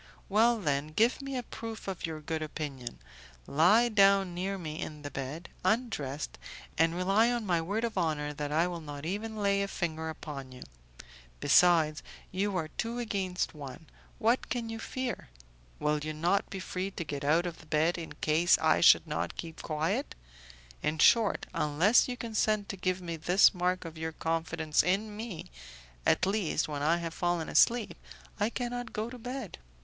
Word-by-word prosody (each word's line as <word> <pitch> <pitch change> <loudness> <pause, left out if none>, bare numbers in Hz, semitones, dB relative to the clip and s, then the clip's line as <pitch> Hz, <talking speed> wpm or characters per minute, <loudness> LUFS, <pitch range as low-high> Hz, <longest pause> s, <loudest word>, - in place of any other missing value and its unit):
"Well, 225 +3 +4
then, 145 -5 0
give 225 - +2
me 275 -1 -4
a 250 - -3
proof 225 -2 -7
of 185 -2 -3
your 155 -1 -6
good 160 +1 -3
opinion; 145 -5 -5 0.5
lie 185 +11 +5
down 195 -4 +4
near 190 +3 -2
me 155 -4 -6
in 150 -1 -6
the 145 - -5
bed, 140 +6 -5 0.2
undressed, 185 - -1 0.4
and 165 +1 +2
rely 195 +6 +3
on 240 -2 -2
my 175 -4 +1
word 205 +7 -2
of 225 -5 -1
honour 150 -3 -1
that 145 0 -4
I 160 +3 +3
will 175 -2 -4
not 145 -1 -7
even 210 +5 -3
lay 200 -1 +2
a 200 - 0
finger 160 -4 -3
upon 140 -4 -7
you. 125 - -10 0.8
Besides, 160 - +4 0.3
you 195 +1 0
are 160 -3 -2
two 230 +7 -3
against 195 -6 -2
one, 145 +1 -9 0.3
what 235 +2 +1
can 235 -2 -2
you 225 - -5
fear? 250 - -4 0.5
Will 150 0 +1
you 155 +1 -4
not 175 +6 +1
be 195 - -5
free 185 +1 -3
to 190 - -5
get 145 -2 -5
out 160 +5 +3
of 170 -2 -5
the 160 - -15
bed 155 +3 +2
in 165 - -7
case 160 +3 +3
I 155 -1 +3
should 170 - +7
not 150 -2 -3
keep 165 -1 -7
quiet? 165 - -2 0.7
In 155 - -1
short, 220 +5 +4
unless 165 +10 +4
you 250 -1 -4
consent 215 -3 0
to - - -3
give 185 0 -1
me 170 -1 -4
this 180 +5 +5
mark 180 0 0
of 160 -1 -8
your 160 0 -3
confidence 160 -1 0
in 205 +4 0
me, 215 - -7 0.6
at - - +4
least 195 -5 0
when 145 -2 -4
I 160 +4 +3
have 165 -1 -4
fallen 175 -2 -1
asleep, 235 -2 +3 0.4
I 205 +2 +2
cannot 245 -1 -4
go 215 +1 -2
to 250 +1 -9
bed." 250 -3 -6
175 Hz, 180 wpm, -30 LUFS, 155-215 Hz, 0.8 s, should